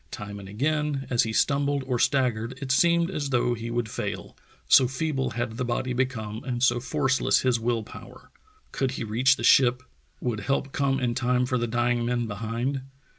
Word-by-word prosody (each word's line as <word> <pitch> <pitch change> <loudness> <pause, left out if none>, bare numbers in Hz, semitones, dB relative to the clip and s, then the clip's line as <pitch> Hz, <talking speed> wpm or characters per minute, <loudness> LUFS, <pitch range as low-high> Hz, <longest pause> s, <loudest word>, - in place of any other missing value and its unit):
Time 105 0 -7
and 95 -1 -10
again, 145 +4 -1
as 120 - +4
he 110 - -1
stumbled 140 +3 +1
or 125 -2 -1
staggered, 125 -3 +1
it 135 -2 -3
seemed 170 +4 +3
as 145 -6 -3
though 120 -1 +1
he 115 0 -5
would 120 -1 -1
fail, - - -5 0.3
so 130 - +6
feeble 135 -1 -2
had 120 -1 -3
the 125 - -1
body 125 +1 -2
become 115 -4 -3
and 125 -1 -3
so 120 -2 +3
forceless 135 +1 +1
his 125 -2 +1
will 115 -1 -1
power. - - -13 0.4
Could 135 - -1
he 130 - -4
reach 120 +5 +3
the - - -7
ship? 125 -1 +5 0.4
Would 120 -4 -2
help 135 +5 -1
come 135 -1 0
in 120 -2 0
time 125 0 +1
for 125 0 -1
the 120 - -1
dying 120 +1 0
men 120 0 -1
behind? 115 +5 -3
125 Hz, 190 wpm, -26 LUFS, 115-135 Hz, 0.4 s, so